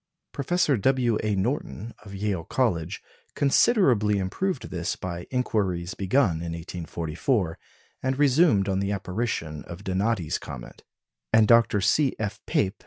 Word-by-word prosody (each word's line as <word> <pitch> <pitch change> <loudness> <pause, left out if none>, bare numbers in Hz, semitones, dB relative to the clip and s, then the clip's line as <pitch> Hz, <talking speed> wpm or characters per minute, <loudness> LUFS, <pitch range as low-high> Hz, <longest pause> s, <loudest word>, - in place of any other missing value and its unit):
Professor 145 -1 +1
W. 120 -1 +2
A. 105 -2 0
Norton, 115 +1 -2
of 100 -2 -9
Yale 95 -4 -2
College, 95 -4 -1 0.3
considerably 135 - +3
improved 125 - -2
this 85 -2 -2
by 90 -1 -6
inquiries 95 -8 -1
begun 100 -2 +2
in 85 0 -4
1844, 85 - -2 0.4
and 130 0 -1
resumed 140 - +4
on 95 -1 0
the 100 +1 -1
apparition 95 -6 -3
of 85 +3 -9
Donati's 95 -2 0
comet; 65 -4 -9 0.5
and 110 -1 +5
Dr. 115 -3 +5
C. 130 +8 +2
F. 105 -1 -3
100 Hz, 125 wpm, -26 LUFS, 90-125 Hz, 0.5 s, and